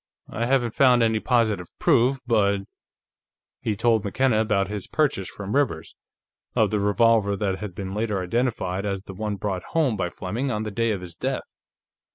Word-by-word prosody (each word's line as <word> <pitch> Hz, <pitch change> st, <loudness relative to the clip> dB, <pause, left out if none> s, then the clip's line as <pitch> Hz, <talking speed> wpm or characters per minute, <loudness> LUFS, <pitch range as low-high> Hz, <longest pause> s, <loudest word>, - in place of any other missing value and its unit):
"I 115 Hz, +1 st, -1 dB
haven't 120 Hz, -3 st, +1 dB
found 125 Hz, -3 st, +5 dB
any 110 Hz, -1 st, +2 dB
positive 110 Hz, -7 st, +1 dB
proof, 130 Hz, +3 st, +3 dB
but 100 Hz, -4 st, +2 dB, 0.5 s
" -, -, -69 dB
He 110 Hz, -, -1 dB
told 110 Hz, 0 st, +2 dB
McKenna 110 Hz, +2 st, +1 dB
about 105 Hz, -3 st, +1 dB
his 105 Hz, -1 st, -5 dB
purchase, 140 Hz, -11 st, 0 dB
from 100 Hz, +3 st, -5 dB
Rivers, 145 Hz, -1 st, 0 dB, 0.6 s
of -, -, +3 dB
the 105 Hz, -, +1 dB
revolver 105 Hz, 0 st, +3 dB
that 95 Hz, -1 st, -1 dB
had 105 Hz, -4 st, -6 dB
been 95 Hz, 0 st, -5 dB
later 105 Hz, -1 st, -1 dB
identified 95 Hz, -2 st, -1 dB
as 100 Hz, -2 st, -3 dB
the 95 Hz, -, -9 dB
one 105 Hz, +1 st, -3 dB
brought 95 Hz, -2 st, -3 dB
home 150 Hz, -8 st, +3 dB
by 90 Hz, -3 st, -1 dB
Fleming 110 Hz, +11 st, -3 dB
on 105 Hz, -3 st, -1 dB
the 110 Hz, -, -4 dB
day 115 Hz, +3 st, 0 dB
of 100 Hz, -4 st, -1 dB
his 85 Hz, -2 st, -9 dB
death. -, -, -2 dB
105 Hz, 185 wpm, -24 LUFS, 100-115 Hz, 0.6 s, found